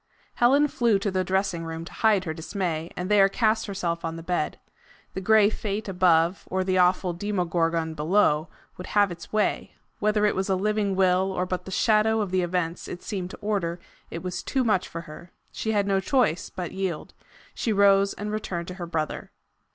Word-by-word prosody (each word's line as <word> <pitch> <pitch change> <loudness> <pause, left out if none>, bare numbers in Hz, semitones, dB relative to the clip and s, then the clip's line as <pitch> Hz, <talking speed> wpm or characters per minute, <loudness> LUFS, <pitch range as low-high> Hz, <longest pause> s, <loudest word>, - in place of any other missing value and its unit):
Helen 275 +5 +4
flew 235 -6 +2
to 200 0 -2
the 185 0 0
dressing 190 -2 -1
room 165 0 -6
to - - -11
hide 215 -4 +3
her 160 -3 -3
dismay, 165 -1 -3
and 180 - -3
there 200 -1 +5
cast 220 +1 +1
herself 175 -4 -3
on 165 0 -3
the 165 - -8
bed. 175 -3 -1 0.6
The 190 - -4
gray 215 +1 +5
Fate 210 0 -4
above, 180 -1 +2
or 190 0 0
the 185 0 +1
awful 180 0 +3
Demo 190 0 -2
gorgon 165 -1 0
beneath, 155 0 +2 0.3
would 180 - -8
have 205 -2 +3
its 170 0 -9
way! 215 -1 -1 0.2
Whether 210 0 +2
it 210 - +3
was 190 +1 -1
a 190 - +3
living 205 0 0
Will 190 0 +2
or 180 -1 -1
but 180 -1 -4
the - - -8
shadow 220 +2 +2
of 205 -4 -2
the 185 0 +2
events 175 -1 -2
it 175 - -7
seemed 190 -4 -4
to - - -9
order, 190 -5 -1 0.3
it 165 - -6
was 180 -1 -4
too 265 -2 -1
much 210 -6 +1
for 165 - -6
her. 165 +2 -12 0.2
She 220 - -3
had 205 -2 +1
no 195 -1 +2
choice 200 - +1
but 180 -2 -6
yield. 190 -5 -4 0.4
She 230 - -2
rose 200 -1 +4
and 210 +1 -5
returned 180 -5 -4
to - - -5
her 170 - -4
brother. 160 -2 -3
190 Hz, 205 wpm, -25 LUFS, 170-210 Hz, 0.6 s, there